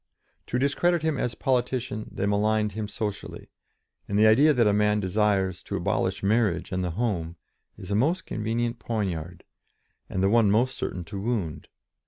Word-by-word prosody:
To 125 - -1
discredit 155 +5 +1
him 160 -4 0
as 120 - -2
politician 125 -4 -1
they - - -2
maligned 105 +1 +1
him 105 +1 -4
socially, 105 -1 -5 0.6
and 100 - -1
the 105 - +5
idea 135 +8 +6
that 125 -5 +3
a 105 - +3
man 105 0 +2
desires 95 -1 +1
"to - - -5
abolish - - -1
marriage 105 -3 +1
and 90 0 -1
the 90 - -1
home," 90 -8 -1 0.4
is 95 - -9
a - - +1
most 160 - +1
convenient 115 +2 -2
poniard, 90 -7 -3 0.7
and 95 - -1
the - - +4
one 115 -3 +4
most 120 +6 +2
certain 90 - -4
to 100 +3 -7
wound. 105 -9 -3
105 Hz, 170 wpm, -26 LUFS, 100-120 Hz, 0.7 s, idea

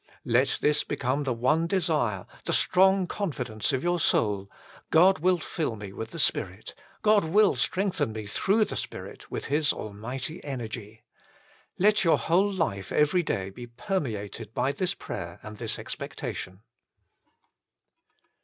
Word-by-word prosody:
Let 125 +3 +2
this 150 0 +3
become 135 +3 -1
the 130 - 0
one 155 +8 +2
desire, 155 - 0 0.2
the - - 0
strong 190 +1 +4
confidence 135 - -2
of 130 -1 -1
your 175 0 +1
soul: 100 -9 +2 0.4
"God 185 +4 +6
will 180 +2 +3
fill 155 -7 -3
me 100 -2 -8
with 110 +2 -5
the - - -8
Spirit: - - 0 0.3
God 210 -1 +5
will 200 +6 +4
strengthen 185 - 0
me 110 -1 -6
through 200 - +2
the - - -5
Spirit - - -6
with - - -4
His 150 +1 +2
Almighty 125 - -5
energy." 115 -5 -6 0.7
Let 210 +2 +4
your 165 - +5
whole 190 +5 +2
life 100 - -2
every 150 +4 +3
day 95 - -2
be 120 +4 -9
permeated 115 - -4
by 130 +3 +1
this 185 +7 -1
prayer 85 -3 -6
and 105 0 -8
this - - -2
expectation. 95 +3 -6
140 Hz, 145 wpm, -27 LUFS, 110-180 Hz, 0.7 s, God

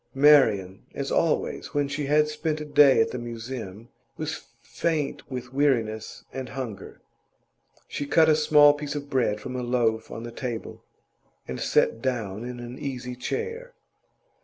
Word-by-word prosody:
Marian, 115 -10 +4
as - - -3
always - - 0
when 145 -1 +2
she 145 0 -3
had 150 +1 +4
spent 150 0 -2
a 150 - -5
day 145 -3 +6
at - - +1
the 125 - -4
Museum, 115 -2 -7 0.3
was 160 +1 -5
faint 145 +6 -2
with 125 -1 -6
weariness 115 -6 0
and 130 -1 -5
hunger; 125 -7 -7 0.9
she 145 - -4
cut 160 +2 +5
a 155 - +5
small 150 -1 +6
piece 145 0 -5
of 145 0 -6
bread 115 -5 +1
from 125 +4 -6
a 125 - -2
loaf 120 -2 0
on 115 - -7
the 120 - -7
table, 120 -1 -6 0.6
and 65 - -5
sat 115 - +2
down 115 -5 -2
in 125 0 -6
an 120 +1 -8
easy 125 -3 -5
chair. 460 - -4
130 Hz, 160 wpm, -26 LUFS, 115-145 Hz, 0.9 s, day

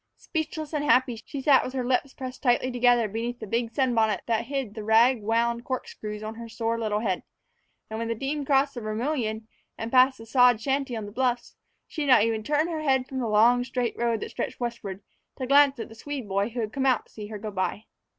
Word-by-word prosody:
Speechless 315 -2 -4
and 295 -1 0
happy, 250 -4 +2
she 275 -2 -5
sat 275 -2 +5
with 255 - -5
her 255 -2 -2
lips 260 +2 0
pressed 260 -1 -7
tightly 255 0 +2
together 245 -2 +3
beneath 230 +4 -4
the 220 - -6
big 230 +2 -1
sunbonnet 230 -5 +1
that 230 -1 0
hid 270 -5 -3
the 215 -1 -6
rag 225 +3 +4
wound 235 +2 0
corkscrews 215 -5 -5
on 215 +1 -5
her 230 0 -9
sore 230 +1 -2
little 215 -2 -1
head; 190 -5 -1 0.7
and 220 0 -5
when 230 - -2
the 230 - -1
team 280 +5 -3
crossed 275 0 +2
the 240 - -6
Vermilion 220 0 -2 0.3
and 225 +1 -5
passed 260 +1 +5
the 225 - -11
sod 245 -1 +5
shanty 270 0 -1
on 220 -2 -4
the 205 - -9
bluffs, 245 +1 -1 0.3
she 315 - -5
did 290 - -1
not 225 - +6
even 225 -1 0
turn 295 +7 +1
her 330 -2 -3
eyes 265 -4 +2
from 265 - -4
the 240 - -1
long, 235 +4 +5
straight 245 -2 -2
road 235 -2 0
that - - -5
stretched - - -4
westward 215 -5 -5 0.3
to 260 - -3
glance 280 +1 +5
at 230 - -5
the - - -13
Swede 265 0 -6
boy 200 +2 0
who 240 +1 -4
had 215 -1 -4
come 270 -1 0
out 255 -4 +2
to - - -26
see 210 -1 -8
her 215 0 -6
go 210 +1 -6
by. 195 +2 -2
240 Hz, 235 wpm, -26 LUFS, 220-265 Hz, 0.7 s, not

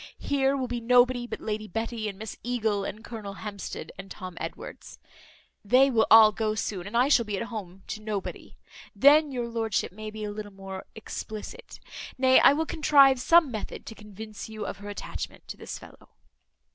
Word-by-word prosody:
Here 275 -1 +1
will 260 -2 -2
be 240 -1 -3
nobody 245 +1 +4
but - - -6
Lady 215 0 -3
Betty, 225 +2 -3
and 195 - -9
Miss 220 +1 -7
Eagle, 220 -4 -1
and 215 +2 -6
Colonel 215 -4 -7
Hampsted, 200 +2 -7
and 195 0 -8
Tom 185 -3 -8
Edwards; - - -8 0.7
they 255 +6 +5
will 225 -3 +3
all 220 -1 +9
go 215 0 -1
soon 195 -4 -3
and 210 - -2
I 250 +2 +4
shall 270 -4 +4
be 210 -3 -3
at - - -2
home 195 -5 -7
to 215 0 -5
nobody. 215 -2 -5 0.4
Then 290 +7 +6
your 245 -2 -3
lordship 225 -3 -1
may 215 +3 -7
be 215 0 -7
a 210 - -3
little 205 -1 -7
more 195 -1 -8
explicit. 220 - -8 0.4
Nay, 260 0 +6
I - - +7
will 315 +3 0
contrive 280 -4 +5
some 330 +1 +5
method 215 -3 -6
to - - -8
convince 215 0 -9
you 215 -1 -6
of - - -5
her 205 0 -9
attachment 205 - -7
to - - -5
this - - -7
fellow." - - -15
220 Hz, 190 wpm, -27 LUFS, 205-245 Hz, 0.7 s, all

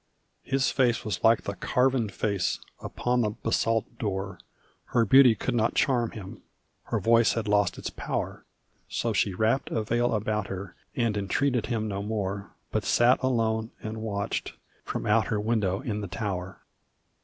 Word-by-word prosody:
His 135 0 +1
face 120 -3 +2
was 105 -5 -3
like 115 0 +5
the 100 - -3
carven 125 +3 +1
face 100 -3 -1 0.2
upon 125 0 -1
the 110 - +1
basalt 115 0 -1
door; 95 -4 -3 0.5
Her 115 -2 +2
beauty 130 +1 +7
could 125 +4 -2
not 115 -1 +1
charm 120 -4 +2
him, 95 -3 -9 0.4
her - - -1
voice 115 -2 +4
had 115 -1 -2
lost 105 -1 +2
its - - -5
power; - - -4 0.5
So - - -1
she 95 - +1
wrapped 115 +7 +1
a 110 - -1
veil 120 +2 +1
about 105 -1 -1
her 95 -1 -6 0.2
and 115 -3 +1
entreated 120 +5 0
him 110 -3 -1
no 100 -1 -3
more 100 -2 -3 0.2
But - - 0
sat 120 +2 +4
alone 115 -3 +1
and 110 0 -4
watched, 100 -2 -3 0.3
from - - -4
out 105 +1 +3
her 105 - 0
window 105 -3 0
in 110 -6 -3
the 100 - -4
tower. 95 -2 -4
110 Hz, 165 wpm, -27 LUFS, 100-120 Hz, 0.5 s, beauty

